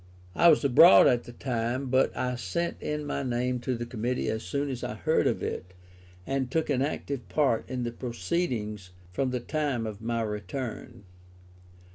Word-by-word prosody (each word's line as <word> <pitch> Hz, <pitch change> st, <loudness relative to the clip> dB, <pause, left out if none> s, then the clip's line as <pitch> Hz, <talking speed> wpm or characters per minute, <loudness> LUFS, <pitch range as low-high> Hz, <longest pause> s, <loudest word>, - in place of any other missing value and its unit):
I 170 Hz, -, +5 dB
was 155 Hz, -3 st, +6 dB
abroad 120 Hz, -7 st, +8 dB
at 120 Hz, -1 st, +3 dB
the -, -, -9 dB
time, 120 Hz, +1 st, -2 dB
but 130 Hz, 0 st, +3 dB
I 125 Hz, 0 st, -1 dB
sent 125 Hz, -, -3 dB
in 150 Hz, 0 st, -3 dB
my 145 Hz, -, -2 dB
name 125 Hz, -1 st, -1 dB
to 125 Hz, +1 st, -2 dB
the 120 Hz, -, -4 dB
Committee 120 Hz, +1 st, -2 dB
as 110 Hz, 0 st, -2 dB
soon 140 Hz, +5 st, -2 dB
as 125 Hz, -2 st, -5 dB
I -, -, -3 dB
heard -, -, +1 dB
of -, -, -1 dB
it, 90 Hz, 0 st, -5 dB, 0.5 s
and 135 Hz, 0 st, -1 dB
took 160 Hz, +2 st, 0 dB
an 130 Hz, -2 st, +1 dB
active 140 Hz, -2 st, -3 dB
part 135 Hz, -7 st, +1 dB
in 125 Hz, -1 st, -3 dB
the 120 Hz, -, -2 dB
proceedings 115 Hz, -, -3 dB, 0.2 s
from 130 Hz, +8 st, 0 dB
the 125 Hz, 0 st, -2 dB
time 140 Hz, -3 st, -2 dB
of 110 Hz, -1 st, -6 dB
my 115 Hz, 0 st, -1 dB
return. 105 Hz, 0 st, -5 dB
125 Hz, 180 wpm, -28 LUFS, 115-135 Hz, 0.5 s, abroad